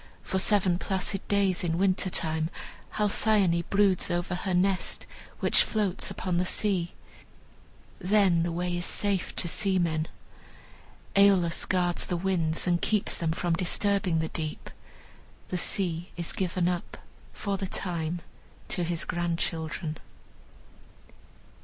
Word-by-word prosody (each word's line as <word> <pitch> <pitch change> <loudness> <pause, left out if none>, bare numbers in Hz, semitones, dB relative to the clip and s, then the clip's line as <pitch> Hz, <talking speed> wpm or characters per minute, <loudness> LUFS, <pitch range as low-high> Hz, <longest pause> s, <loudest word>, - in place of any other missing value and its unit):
For 190 - -1
seven 190 -3 +2
placid 190 0 -2
days, 200 -2 +2
in 165 -1 0
winter 190 0 +2
time, 160 -2 0 0.5
Halcyone 205 -4 +3
broods 200 -2 +3
over 175 +1 -1
her 185 +1 -2
nest, 185 +1 +1 0.4
which - - +5
floats 205 -4 0
upon 180 -2 -2
the 180 - +2
sea. 185 -2 0 1.1
Then 190 -3 +3
the 170 +1 0
way 175 +1 -2
is 175 - -2
safe 200 0 0
to 175 - -2
seamen. 170 -4 +1 1.1
Aeolus 195 -4 +4
guards 175 -2 0
the 175 - -1
winds 170 -3 0
and 175 -1 +2
keeps 210 -2 +1
them 165 -2 -1
from 170 +1 0
disturbing 185 0 +1
the 160 0 -1
deep. 155 -1 -5 0.8
The 180 - -1
sea 175 -2 -1
is 170 -1 -2
given 180 -1 0
up, 180 -1 -3 0.3
for 200 -1 -3
the 190 -1 -3
time, 170 -2 -3 0.5
to 180 - -1
his 170 -1 -2
grandchildren. 165 -2 -2
180 Hz, 130 wpm, -28 LUFS, 170-195 Hz, 1.1 s, which